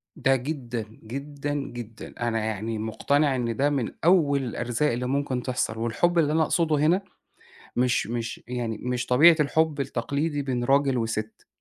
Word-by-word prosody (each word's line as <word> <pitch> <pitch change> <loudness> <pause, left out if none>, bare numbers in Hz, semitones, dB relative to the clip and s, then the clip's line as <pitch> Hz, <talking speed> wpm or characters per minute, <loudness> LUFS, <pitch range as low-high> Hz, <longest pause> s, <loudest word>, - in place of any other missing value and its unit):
ده 135 - +3
جدًا، 125 -4 -4 0.2
جدًا، 140 +5 -5
جدًا، 120 -5 -6
أنا 120 -2 0
يعني 110 +1 -3
مُقتنع 140 +6 +1
إن 120 -2 -1
ده 140 +5 +2
من 135 -5 -1
أول 150 -6 +4
الأرزاق 120 +3 -1
اللي 125 +2 -2
ممكن 130 -2 -1
تحصل، 125 -3 -2
والحُب 120 +10 +1
اللي 150 -2 +2
أنا 160 - +3
أقصده 160 -1 +1
هنا 160 +6 +3 0.8
مش 125 0 +2
مش 115 0 -4
يعني 120 -3 -3
مش 125 +1 -2
طبيعة 160 +7 +7
الحُب 150 0 +1
التقليدي 140 +3 -1
بين 125 -3 -2
راجل 135 0 +3
وسِت، 110 -1 -4
130 Hz, 155 wpm, -26 LUFS, 120-145 Hz, 0.8 s, طبيعة